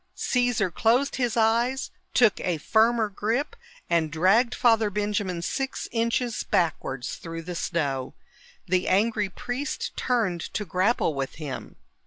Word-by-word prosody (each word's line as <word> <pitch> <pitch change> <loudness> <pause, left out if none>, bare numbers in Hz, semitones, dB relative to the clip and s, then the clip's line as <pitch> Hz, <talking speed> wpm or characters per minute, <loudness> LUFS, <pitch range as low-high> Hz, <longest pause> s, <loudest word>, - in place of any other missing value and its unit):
Caesar 245 -7 +1
closed 240 - +2
his 245 -3 0
eyes, 235 +4 +2 0.2
took 220 -5 +4
a 175 -3 -1
firmer 220 +7 +3
grip 225 +8 -2 0.3
and 165 -2 +1
dragged 195 - +3
Father 225 -3 +3
Benjamin 205 -4 -2
six 270 +8 -3
inches 235 0 0
backwards 135 -7 -1
through 165 0 -7
the 180 +2 -5
snow. 140 -7 -2 0.5
The 180 +1 +1
angry 210 +1 +2
priest 245 +9 -4
turned 215 -9 0
to 210 - -1
grapple 185 0 +1
with 135 -1 -4
him. 150 -4 -7
210 Hz, 130 wpm, -26 LUFS, 170-235 Hz, 0.5 s, took